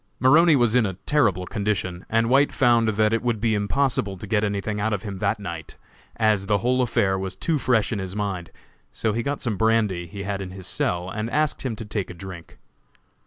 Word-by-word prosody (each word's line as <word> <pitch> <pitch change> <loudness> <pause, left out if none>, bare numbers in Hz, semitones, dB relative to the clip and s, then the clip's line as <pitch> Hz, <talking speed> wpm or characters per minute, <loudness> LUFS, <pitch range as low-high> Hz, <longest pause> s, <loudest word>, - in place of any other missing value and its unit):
Maroney 155 +5 +6
was 120 -4 +3
in 125 -1 +4
a 95 - -5
terrible 105 - +2
condition, 95 -3 -3
and 115 +1 +2
White 135 +4 +4
found 120 -3 +3
that 110 0 +2
it 115 - +1
would 120 -3 -1
be 110 +1 +1
impossible 105 -1 0
to 95 - -8
get 105 0 +1
anything 105 0 -2
out 110 +1 0
of 100 - -3
him 100 -3 -6
that 105 - 0
night, 85 -5 -7 0.4
as 110 -3 +1
the 105 -1 +3
whole 125 +5 +1
affair 115 -6 +1
was 95 -1 -4
too 160 -3 -1
fresh 120 -3 +1
in 105 - -2
his 95 0 -5
mind; 95 -5 -3 0.4
so 110 -2 -1
he 115 - -1
got 140 +4 -3
some 115 -5 -1
brandy 105 -5 +1
he 100 +2 -7
had 100 0 -3
in 95 - -5
his 95 0 -9
cell, 90 +1 -1
and 110 +2 -3
asked 150 +3 0
him 125 -4 -3
to 115 - -7
take 105 -2 -3
a - - -8
drink. 85 -2 -10
105 Hz, 220 wpm, -24 LUFS, 95-115 Hz, 0.4 s, Maroney